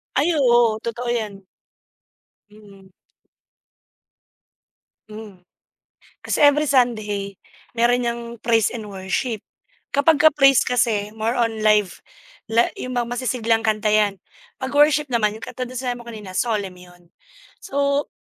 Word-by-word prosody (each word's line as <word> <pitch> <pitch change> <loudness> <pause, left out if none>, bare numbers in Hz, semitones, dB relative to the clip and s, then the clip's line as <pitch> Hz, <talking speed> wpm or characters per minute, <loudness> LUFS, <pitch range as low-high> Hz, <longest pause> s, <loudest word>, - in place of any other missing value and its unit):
Ay, 290 +5 +2
oo, 240 -5 +3
totoo 235 +1 -4
yan. 215 -4 -3 1.1
Mm. 200 -2 -18 2.2
Hmm. 210 -4 -11 0.8
Kasi - - -2
every 290 0 +4
Sunday, 215 -6 0 0.4
meron 240 +1 +2
yang 235 0 -2 0.2
praise 225 -2 +2
and 225 -3 -7
worship. 200 +3 -3 0.5
Kapag 285 +2 +3
ka 315 - +8
praise 275 -2 +4
kasi 220 -4 0
more 225 +2 -1
on 230 -3 -1
live 210 -3 +2 0.5
la 230 +1 +3
yung 255 0 -5
mga 240 -1 0
masisiglang 235 -2 0
kanta 215 -1 +1
yan. 210 -1 +2 0.4
Pag 260 0 -4
worship 295 -1 +3
naman 215 -3 +1
yung - - -8
katulad 255 -1 -6
ng - - -4
sinabi 245 -1 -3
mo - - -12
kanina, 215 -4 -9
solemn 205 -3 -1
yun. 180 0 -17 0.6
So, 280 -4 -1
230 Hz, 130 wpm, -21 LUFS, 210-255 Hz, 2.2 s, ka